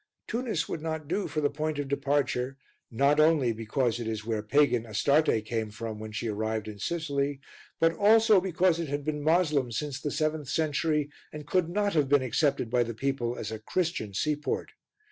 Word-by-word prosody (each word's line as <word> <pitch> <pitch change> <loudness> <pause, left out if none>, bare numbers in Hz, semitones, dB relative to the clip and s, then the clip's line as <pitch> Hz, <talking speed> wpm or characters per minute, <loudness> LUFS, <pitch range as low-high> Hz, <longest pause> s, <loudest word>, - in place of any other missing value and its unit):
Tunis 230 -9 -2
would 160 - -4
not 160 -2 -4
do 190 +5 -1
for 155 - -2
the 145 - +2
point 155 +1 -2
of 145 -1 -2
departure, 140 -2 0 0.3
not 140 +5 +2
only 155 -6 +4
because 115 +2 -1
it 115 - -4
is 110 -1 -3
where 110 -2 -1
pagan 125 +1 +3
Astarte 115 +1 +2
came 110 -1 -2
from 110 0 -6
when 110 0 -7
she 115 +2 -3
arrived 110 0 -2
in 105 -1 -8
Sicily, 140 - -1 0.4
but 165 0 +4
also 215 +2 +5
because 180 -2 +2
it 165 - -2
had 145 0 -3
been 150 -1 -2
Moslem 155 -5 +2
since 135 +2 -3
the 145 - -2
seventh 155 -1 -1
century 150 -1 0 0.2
and 150 -1 -8
could 175 +2 +1
not 205 +2 0
have 150 -4 +2
been 145 -2 +4
accepted 135 0 +1
by 125 -1 +3
the 115 -1 -2
people 125 -1 -2
as 105 - -5
a 110 - -5
Christian 135 - -2
seaport. 150 - -1
145 Hz, 190 wpm, -28 LUFS, 115-160 Hz, 0.4 s, also